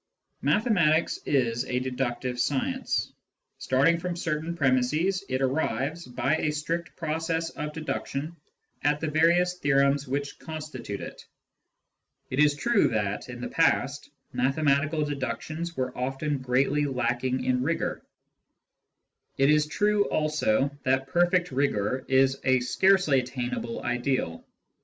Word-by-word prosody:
Mathematics 180 -9 +2
is 120 -4 +1
a 125 - -2
deductive 125 -1 -2
science: 135 +2 -1 0.5
starting 145 +6 +3
from 180 0 -3
certain 165 -1 -2
^ - - -9
premisses, 150 +8 +1
it 130 +1 0
arrives, 140 +3 -1
by 135 +5 0
a 155 - 0
strict 165 +3 -3
process 160 +1 -2
of 150 0 -5
deduction, 155 0 -4 0.5
at 145 0 +2
the 155 -1 -2
various 175 +3 +3
theorems 140 0 +2
which 140 +2 -3
constitute 155 -10 -6
it. - - -8 1.1
It 130 - -1
is 150 -1 +5
true 235 +7 +3
that, 105 -3 -2
in - - -7
the - - -3
past, - - +1 0.2
mathematical 145 +3 +1
deductions 145 +5 -4
were 130 -1 -2
often 135 +3 -2
greatly 135 +3 +1
lacking 125 -1 -1
in 125 0 +1
rigour; 165 +6 -1 1.4
it 135 +2 +4
is 150 0 +3
true 205 +5 +2
also 145 -3 +1
that 130 +1 0
perfect 175 0 +2
rigour 130 -2 0
is 135 0 +3
a 130 -1 +4
scarcely 180 0 +3
attainable 125 -2 -4
ideal. 120 -8 -1
140 Hz, 125 wpm, -27 LUFS, 130-160 Hz, 1.4 s, is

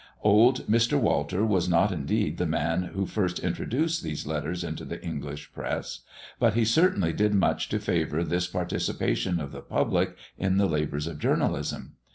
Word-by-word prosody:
Old 110 +5 +5
Mr. 115 +2 +3
Walter 90 +9 +1
was 95 -5 +1
not 90 +4 +3
indeed 75 -6 -1
the - - +1
man 85 +4 0
who 95 0 0
first 95 -3 -1
introduced 160 +6 -1
these 75 -2 -4
letters 80 +3 -3
into - - -5
the - - -6
English 75 +1 -6
press, - - -4 0.4
but 115 -4 +3
he 115 -1 +3
certainly 115 - +3
did 105 +3 +2
much 95 - +1
to - - 0
favour 80 +3 0
this 90 +2 0
participation 90 0 -1
of 70 -3 -5
the - - -8
public - - 0 0.2
in 95 0 +1
the 100 - +4
labours 75 -3 -1
of 80 -3 -6
journalism. - - -1
90 Hz, 170 wpm, -27 LUFS, 80-105 Hz, 0.4 s, Old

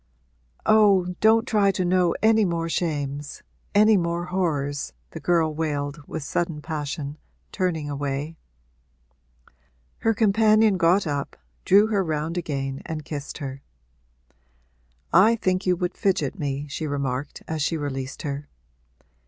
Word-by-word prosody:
'Oh, 200 -4 +4
don't 220 +1 +4
try 205 -3 +3
to 185 -1 0
know 180 -1 +2
any 220 0 +5
more 170 -3 -1
shames 145 -4 -3 0.3
any 215 +1 +6
more 170 0 -1
horrors!' 145 -6 -2 0.2
the 160 - -7
girl 165 -2 +2
wailed 150 -1 -2
with 160 - -5
sudden 165 +1 -2
passion, 150 -1 -5 0.3
turning 170 -6 -1
away. 145 +2 -3 1.6
Her 225 -1 +1
companion 215 -1 +4
got 180 +3 +3
up, 145 -2 -3 0.3
drew 200 +2 +6
her 210 -3 +1
round 160 0 -2
again 135 -5 -3
and 155 -2 -6
kissed 145 -2 -6
her. 135 -2 -6 1.5
'I 205 +7 +6
think 185 -3 -1
you 180 - +4
would 180 +1 -2
fidget 195 0 0
me,' 140 -1 -2
she 155 +2 -4
remarked 140 -1 -3
as 160 -1 -3
she 160 +3 0
released 135 -3 -5
her. 145 -1 -4
165 Hz, 130 wpm, -24 LUFS, 145-190 Hz, 1.6 s, any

